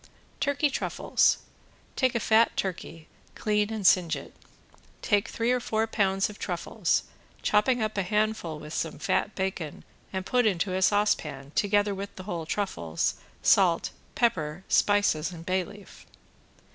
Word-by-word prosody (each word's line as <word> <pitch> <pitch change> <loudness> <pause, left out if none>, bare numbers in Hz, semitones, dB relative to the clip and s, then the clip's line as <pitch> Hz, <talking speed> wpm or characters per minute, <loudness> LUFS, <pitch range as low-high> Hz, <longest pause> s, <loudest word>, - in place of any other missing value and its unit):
~TURKEY 285 +1 +1
TRUFFLES~ - - +2 0.6
Take 255 -3 +1
a - - +2
fat 225 +1 +3
turkey, 165 -4 -4 0.3
clean 210 0 0
and 215 -3 -4
singe 175 -2 +5
it. - - -9 0.7
Take 205 -1 +2
three 230 +2 0
or 250 - +2
four 220 -1 0
pounds 195 -3 +1
of 210 - -11
truffles, - - -1 0.4
chopping 220 +3 +3
up 215 0 -2
a - - +3
handful 210 -4 -1
with 150 +1 -9
some 160 - -2
fat 210 - 0
bacon 190 -5 -4 0.3
and 190 -1 -3
put 245 0 +2
into 185 -1 0
a 190 - -1
saucepan, 155 -9 +1
together 205 0 +2
with 200 +1 -6
the 185 - -8
whole 170 -5 -4
truffles, 85 - -1 0.3
salt, 180 -4 +4 0.2
pepper, 175 -7 0
spices 200 -5 +2
and 170 -2 -9
a - - -13
bay 185 +1 +1
leaf. 205 +2 -14
200 Hz, 150 wpm, -27 LUFS, 175-215 Hz, 0.7 s, singe